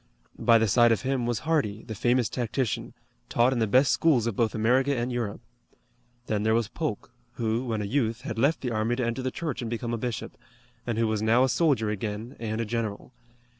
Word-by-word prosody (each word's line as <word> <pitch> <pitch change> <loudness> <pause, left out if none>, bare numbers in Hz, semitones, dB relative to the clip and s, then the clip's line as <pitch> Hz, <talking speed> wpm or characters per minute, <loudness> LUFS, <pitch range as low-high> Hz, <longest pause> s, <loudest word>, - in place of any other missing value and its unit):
By 115 -1 +5
the 110 0 +2
side 120 +3 +5
of 110 - +1
him 130 -2 0
was 120 -2 -1
Hardee, 125 -10 0
the 110 - -7
famous 120 +2 +2
tactician, 120 0 -2 0.3
taught 120 +2 +3
in 125 - -1
the 110 - +2
best 130 +6 +4
schools 140 -9 +3
of 115 -3 -2
both 115 -1 0
America 130 +5 +2
and 120 +1 -1
Europe. 120 -4 -3 0.8
Then 105 -3 -1
there 110 +1 +2
was 115 -2 +1
Polk, 135 -3 -4 0.2
who, 115 +1 -1
when 110 -3 -2
a - - -3
youth, 115 0 0
had 115 -3 -5
left 140 +7 +2
the 125 - -2
army 110 +2 0
to 125 -1 -1
enter 115 +3 -2
the 130 - -1
church 150 -1 -4
and 115 - -4
become 120 0 -3
a 115 - -2
bishop, 120 -2 -5 0.5
and 115 -2 -1
who 115 - +2
was 110 -1 -1
now 115 +3 +4
a 130 - +2
soldier 120 -5 +2
again 105 +3 -5
and 110 -1 -3
a 115 - -1
general. 110 0 -4
115 Hz, 220 wpm, -27 LUFS, 110-125 Hz, 0.8 s, By